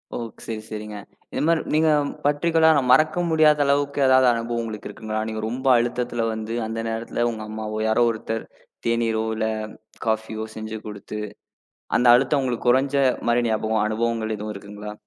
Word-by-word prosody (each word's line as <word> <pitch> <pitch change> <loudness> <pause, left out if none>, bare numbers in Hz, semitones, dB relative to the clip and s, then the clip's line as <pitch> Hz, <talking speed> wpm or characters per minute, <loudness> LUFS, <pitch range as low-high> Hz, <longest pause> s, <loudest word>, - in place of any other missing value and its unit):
ஓ, - - -2 0.3
சரி, 110 -1 -5
சரிங்க. 105 -1 -6 0.4
இந்த - - -1
மாரி 165 -1 +3
நீங்க 160 +1 +4 0.4
பர்டிகுலர்ர 160 0 +4
மறக்க 155 +6 +4
முடியாத 155 -2 +5
அளவுக்கு 140 0 +1
ஏதாவது 130 -1 +5
அனுபவம் 115 0 -2
உங்களுக்கு 110 -2 -6
இருக்குங்களா? 110 +1 -4
நீங்க 110 0 -4
ரொம்ப 130 +3 -4
அழுத்தத்துல 120 0 -1
வந்து 110 +1 -5
அந்த 115 +1 -4
நேரத்துல 115 +1 -2
உங்க 110 -1 -6
அம்மாவோ, 110 0 -4
யாரோ 110 +2 +3
ஒருத்தர் 115 0 -4 0.4
தேநீரோ 115 -1 +1
இல்ல 110 0 -1 0.6
காஃபியோ 110 0 -2
செஞ்சு 110 0 -5
குடுத்து, 105 0 -7 0.8
அந்த 125 - +2
அழுத்தம் 135 +2 +1
உங்களுக்குக் 120 -1 0
குறைஞ்ச 135 +2 +2 0.3
மாரி 120 +1 +3
ஞாபகம், 110 0 0
அனுபவங்கள் 110 0 -1
எதுவும் 105 0 -5
இருக்குங்களா? 105 +1 -8
115 Hz, 150 wpm, -23 LUFS, 110-130 Hz, 0.8 s, முடியாத